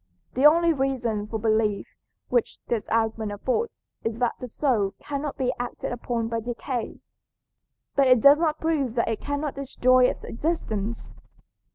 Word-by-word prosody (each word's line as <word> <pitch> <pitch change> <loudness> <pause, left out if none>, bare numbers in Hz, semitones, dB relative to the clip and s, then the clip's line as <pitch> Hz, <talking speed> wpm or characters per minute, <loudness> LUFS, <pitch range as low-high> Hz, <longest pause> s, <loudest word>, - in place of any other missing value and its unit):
The 270 +4 +6
only 335 +2 +4
reason 245 -7 -1
for 220 - -3
belief 215 -1 +1 0.4
which 485 - +1
this 230 -3 -2
argument 225 -2 0
affords 260 - -2 0.2
is 225 0 -2
that 245 -1 +1
the 250 - -6
soul 220 -6 0
cannot 285 0 -4
be 255 -1 0
acted 245 0 -4
upon 235 -1 -2
by 230 0 -2
decay. 240 +1 -4 0.9
But 275 -1 +4
it 255 -1 +6
does 280 +5 +7
not 315 -2 +1
prove 290 -7 0
that 235 - +1
it 225 - -2
cannot 285 0 -2
destroy 255 -2 +3
its - - -1
existence. 230 -7 -3
250 Hz, 155 wpm, -25 LUFS, 225-280 Hz, 0.9 s, does